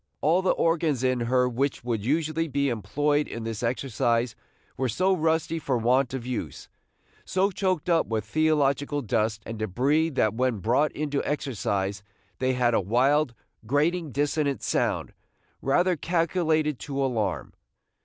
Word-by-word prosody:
All 165 +5 +3
the 190 - 0
organs 160 -6 +1
in 130 -1 +2
her 125 +2 +2
which 130 +2 -1
would 115 -4 -2
usually 155 +5 0
be 140 -1 0
employed 145 +7 0
in 115 - -6
this 115 -2 -4
exercise 120 -1 0 0.4
were 130 0 -1
so 185 - +2
rusty 160 0 0
for 135 -4 0
want 125 +3 +2
of 125 -3 -5
use, 115 - -5 0.6
so 190 +2 +1
choked 185 -3 -1
up 170 -2 +2
with 110 -2 -2
theological 145 +1 +1
dust 110 -2 0
and 115 -1 -6
débris 135 - +1
that 110 -5 +2
when 125 0 0
brought 125 +9 +1
into 145 -1 -2
exercise 100 -8 -2 0.4
they 130 0 +1
had 125 -2 +2
a - - +3
wild, 125 +6 +2 0.3
grating 155 +4 +1
dissonant 145 +1 0
sound, - - -1 0.5
rather 180 +7 +2
calculated 160 -3 0
to 140 -2 -5
alarm. 115 -8 -1
135 Hz, 145 wpm, -26 LUFS, 120-155 Hz, 0.6 s, All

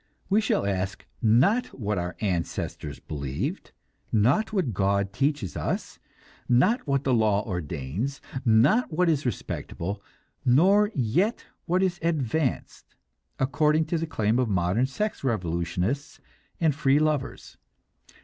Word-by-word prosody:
We 210 +3 +4
shall 205 - 0
ask, 95 -1 -2 0.2
not 140 - +4
what 105 -3 -1
our 90 0 -4
ancestors 85 -6 -3
believed, 70 -3 -4 0.4
not 125 - +2
what 180 - 0
God 100 +1 0
teaches 135 - -1
us, - - -3 0.5
not 185 - +3
what 140 -1 +1
the 130 - +1
law 110 -3 +2
ordains, 90 - -3 0.2
not 130 - +4
what 175 +2 +2
is 150 -4 +1
"respectable," 100 -2 -4 0.4
nor 195 - +4
yet 160 - 0 0.2
what 180 +2 +2
is 180 -2 0
"advanced," 155 -4 -2 0.4
according 150 +4 +2
to 165 - +2
the 165 - -2
claim 110 -5 +1
of 125 -3 +1
modern 95 +6 +1
sex 210 +9 -3
revolutionists 90 - -2 0.4
and 160 -3 +3
"free 140 -1 +3
lovers." 150 -3 -1
130 Hz, 125 wpm, -26 LUFS, 100-155 Hz, 0.5 s, We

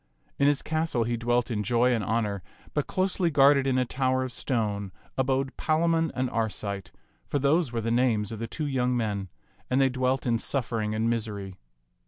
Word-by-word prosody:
In 140 - +4
his 145 -1 +2
castle 155 -6 0
he 120 +1 -1
dwelt 120 +1 0
in 105 -2 -1
joy 120 +3 +2
and 115 -3 0
honor; 105 -2 -1 0.3
but 150 - -1
closely 185 -2 +1
guarded 140 -2 +5
in 130 -1 +2
a 130 - +2
tower 130 +1 0
of 130 - -4
stone 105 -6 -2 0.2
abode 135 0 0
Palamon 165 0 +1
and 130 0 0
Arcite, 105 -3 -3 0.4
for - - 0
those 140 +1 +2
were 115 -1 -2
the 115 +1 -1
names 115 -4 +2
of 110 - -6
the 115 - -3
two 155 +7 -4
young 125 -3 +1
men, 100 -4 -2 0.4
and 130 - +2
they 135 -1 +4
dwelt 130 +1 0
in 115 -2 +1
suffering 115 -5 -1
and 110 +1 0
misery. 105 -5 -3
125 Hz, 190 wpm, -27 LUFS, 110-135 Hz, 0.4 s, guarded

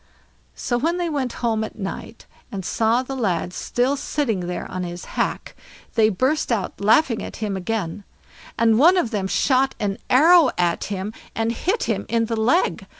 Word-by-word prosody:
So 240 -1 -1
when 330 +6 0
they 350 -1 -1
went 270 -4 -1
home 220 -2 +1
at 220 - -7
night, 210 +2 -7 0.3
and 195 -4 -5
saw 230 +5 +1
the 270 +1 -6
lad 180 -7 -1
still 250 +8 0
sitting 235 -10 -2
there 180 - -4
on 185 - -5
his 175 0 -6
hack, - - -2 0.4
they 220 -2 +4
burst 260 +8 0
out 205 -4 -2
laughing 225 +3 +3
at - - -7
him 210 -3 -3
again, 195 -1 -3 0.5
and 225 -1 +4
one 345 +6 +6
of 245 -10 0
them 200 -4 -1
shot 265 +6 +2
an 200 +1 -2
arrow 320 +3 +6
at 175 -1 0
him 200 +1 -4 0.2
and 225 0 0
hit 370 - -1
him - - -2
in 230 -1 +1
the 230 0 -2
leg. 240 +11 +1
225 Hz, 180 wpm, -22 LUFS, 200-265 Hz, 0.5 s, one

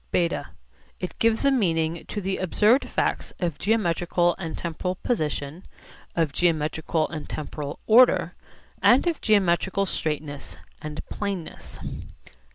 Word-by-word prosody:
(β) 170 -1 +1 0.5
It 180 - -6
gives 230 +3 +2
a 275 - +5
meaning 165 -9 +1
to 210 - -4
the 190 0 -1
observed 210 +8 +3
facts - - -1
of 170 -5 -2
geometrical 175 -4 +2
and 165 -4 -4
temporal 170 +2 -3
position, 155 - -2 0.5
of 160 -4 +1
geometrical 160 -1 +1
and 155 -2 -6
temporal 150 -1 -5
order, 245 +3 +5 0.5
and 245 +7 +5
of 340 -3 0
geometrical 195 -1 +2
straightness 150 -5 -3 0.2
and 150 0 -6
planeness. 200 -5 -5
175 Hz, 120 wpm, -25 LUFS, 160-205 Hz, 0.5 s, a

